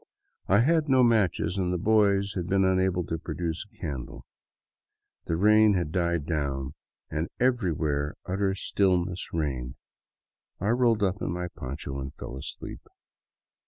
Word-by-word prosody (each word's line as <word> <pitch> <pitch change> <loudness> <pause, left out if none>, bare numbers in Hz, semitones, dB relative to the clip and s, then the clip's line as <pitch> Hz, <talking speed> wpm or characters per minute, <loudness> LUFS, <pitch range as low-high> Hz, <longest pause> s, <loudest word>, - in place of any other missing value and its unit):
I 100 +4 +5
had 155 +3 +2
no 130 -1 +5
matches, 100 -5 +2
and 90 -1 0
the 90 - 0
boys 100 0 +3
had 90 -3 -3
been 95 0 +3
unable 95 -1 +2
to 80 0 -4
produce 85 0 -3
a 105 - -26
candle. 70 -8 -6 1.0
The 85 - 0
rain 105 +3 +5
had 85 -4 -1
died 85 -3 0
down 70 -4 -2 0.4
and 80 +3 -2
everywhere 80 - 0
utter 95 +1 0
stillness 90 -2 0
reigned. 65 -6 -2 0.8
I 100 - -1
rolled 115 -3 +3
up 100 +1 0
in - - -1
my 90 0 -3
poncho 70 0 -6
and 70 +1 -6
fell - - -7
asleep. 65 - -7
90 Hz, 145 wpm, -27 LUFS, 80-100 Hz, 1.0 s, I